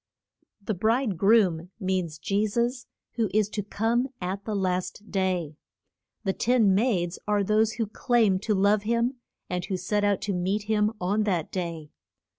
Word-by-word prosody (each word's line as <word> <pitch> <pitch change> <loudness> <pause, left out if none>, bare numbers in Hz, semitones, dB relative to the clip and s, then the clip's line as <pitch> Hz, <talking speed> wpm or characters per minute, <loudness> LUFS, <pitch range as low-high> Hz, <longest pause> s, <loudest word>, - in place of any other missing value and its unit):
The 215 - -1
bride 220 +3 +1
groom 185 -3 +3
means 185 -5 -1
Je 200 +7 0
sus, 240 +4 -1 0.3
who 225 -3 +1
is 215 -1 +3
to 210 - -3
come 225 +5 0
at 190 +2 -4
the 215 - -2
last 185 +2 -2
day. 180 -6 -1 0.7
The 195 -3 0
ten 230 -4 +3
maids 190 -5 +1
are 205 -1 +2
those 215 +2 +2
who 230 -1 -1
claim 215 -2 +2
to 210 +1 0
love 200 +2 +3
him, 235 +4 0 0.3
and 180 0 -2
who 190 - -2
set 205 +3 -1
out 205 -2 +2
to 205 - -2
meet 190 +4 -1
him 210 0 +1
on 200 +4 +1
that 175 -6 -1
day. 170 -5 -4
205 Hz, 165 wpm, -26 LUFS, 185-220 Hz, 0.7 s, groom